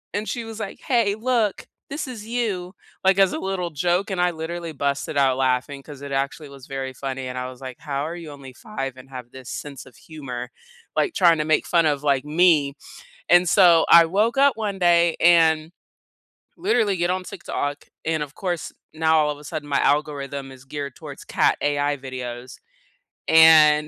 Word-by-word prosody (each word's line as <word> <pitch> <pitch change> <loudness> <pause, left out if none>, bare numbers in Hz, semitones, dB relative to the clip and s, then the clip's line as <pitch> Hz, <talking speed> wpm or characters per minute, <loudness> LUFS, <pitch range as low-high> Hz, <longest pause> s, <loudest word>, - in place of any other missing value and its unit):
and 210 +1 -2
she 240 - -3
was 225 0 -8
like, 205 -3 -6
"Hey, 230 -6 +1
look, 225 -1 -1 0.2
this 285 0 -4
is 225 -5 -8
you." 215 -6 -3 0.3
Like 190 0 +3
as 195 -2 +4
a - - -3
little 190 -2 -3
joke, 175 +5 0
and 190 -2 -3
I 180 0 +2
literally 165 +1 -5
busted 140 0 -2
out 135 -2 +3
laughing 130 +1 -1
'cause 145 -2 -11
it 140 0 -7
actually 140 +2 -3
was 135 -2 -13
very 135 -1 -5
funny, 130 0 -5
and 125 0 -6
I 125 0 -3
was 130 0 -13
like, 130 -2 -8
"How 140 -2 -3
are 165 - -5
you 165 -3 -9
only 135 -2 -11
5 135 - -6
and 130 +1 -14
have 125 -2 -8
this 130 -2 -12
sense 140 -3 -7
of 130 -4 -17
humor, 125 -6 -8 0.5
like, 355 - +1
trying 170 -3 +4
to 150 - -1
make 155 0 +1
fun 170 -2 +3
of, 145 -2 +1
like, 140 -2 +1
me?" 155 -3 +3 0.5
And 175 0 +5
so, 175 -4 +6
I 170 0 +8
woke 210 +8 0
up 280 0 +4
one 210 -3 -3
day 170 -2 +3
and 160 -2 +4 0.9
literally 275 - +1
get 175 0 0
on 185 0 -2
TikTok. 145 -5 -5 0.2
And, 160 -1 0
of 145 -1 -10
course, 175 -4 -3 0.2
now 160 0 +2
all 150 -1 +2
of 145 - -6
a - - -14
sudden, 145 0 -6
my 140 - +1
algorithm 140 -2 -1
is 130 0 -14
geared 140 -1 -6
towards - - -10
cat - - +2
AI 145 0 0
videos, 125 -1 -7 0.7
and 155 -2 +7
155 Hz, 195 wpm, -23 LUFS, 140-180 Hz, 0.9 s, I